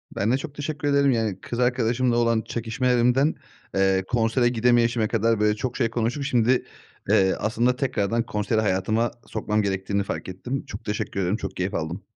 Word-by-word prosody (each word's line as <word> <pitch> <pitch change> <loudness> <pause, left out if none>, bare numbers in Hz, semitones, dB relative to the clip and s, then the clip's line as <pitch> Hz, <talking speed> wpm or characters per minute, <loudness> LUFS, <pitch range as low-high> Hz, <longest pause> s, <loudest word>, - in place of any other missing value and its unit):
Ben 105 +4 +1
de 130 - +3
çok 145 0 -8
teşekkür 145 0 -3
ederim. 140 -1 +4
Yani, 110 -5 -1
kız 120 - -5
arkadaşımla 125 0 +1
olan 115 -1 +2
çekişmelerimden, 125 +5 +1 0.4
eee, 95 0 +2
konsere 120 +1 +2
gidemeyişime 120 -1 +2
kadar 115 0 +1
böyle 105 0 +3
çok 125 +3 -4
şey 120 -4 +1
konuşup 120 +4 -1
şimdi, 125 -2 +2 0.4
eee, 95 -1 +4
aslında 120 +3 +1
tekrardan 115 -4 0
konseri 110 +1 0
hayatıma 110 +4 +1 0.2
sokmam 105 -1 -1
gerektiğini 100 0 -1
fark 95 - -5
ettim. 120 +9 -5
Çok 100 - -9
teşekkür 105 -1 -3
ederim. 95 +3 0
Çok - - -6
keyif 90 +1 -2
aldım. 85 +5 -3
115 Hz, 170 wpm, -24 LUFS, 105-125 Hz, 0.4 s, ederim